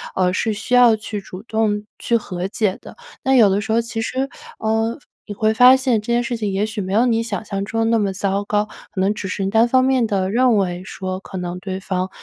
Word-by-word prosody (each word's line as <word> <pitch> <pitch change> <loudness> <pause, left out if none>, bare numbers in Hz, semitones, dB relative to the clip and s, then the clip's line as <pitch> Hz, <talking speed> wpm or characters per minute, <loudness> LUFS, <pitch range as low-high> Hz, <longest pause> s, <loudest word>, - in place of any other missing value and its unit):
呃， 180 -1 +2
是 220 - 0
需 220 +4 -5
要 245 -2 +7
去 215 -1 -6
主 185 -1 -10
动 220 -2 0 0.2
去 235 - +1
和 185 -4 -4
解 205 -3 0
的。 - - -12 0.3
那 265 - +2
有 230 -5 +7
的 195 +2 +1
时 220 +2 -4
候 225 - +3
其 230 -1 -4
实， 260 +4 -2 0.3
呃， 225 +1 0 0.3
你 210 - -5
会 215 +1 +2
发 250 +3 +7
现， 255 -5 +1
这 215 - -15
件 240 +1 +2
事 240 0 -2
情 215 -3 -2
也 195 +2 0
许 215 -1 -4
没 190 0 -4
有 225 +4 +4
你 230 -2 +2
想 220 -3 -4
象 195 -2 -3
中 225 +3 -2
的 - - +2
那 230 - +3
么 200 -2 0
糟 195 +1 -1
糕， 210 0 0 0.2
可 190 - -6
能 195 +2 +2
只 205 -2 -5
是 195 +1 -3
单 225 +4 +3
方 255 +1 +3
面 260 -3 +2
地 195 -3 -1
认 245 0 +3
为 180 -2 -1
说， 185 -1 -5
可 190 0 -9
能 180 0 -4
对 190 0 -5
方 185 -1 -2
215 Hz, 270 characters per minute, -20 LUFS, 195-230 Hz, 0.3 s, 要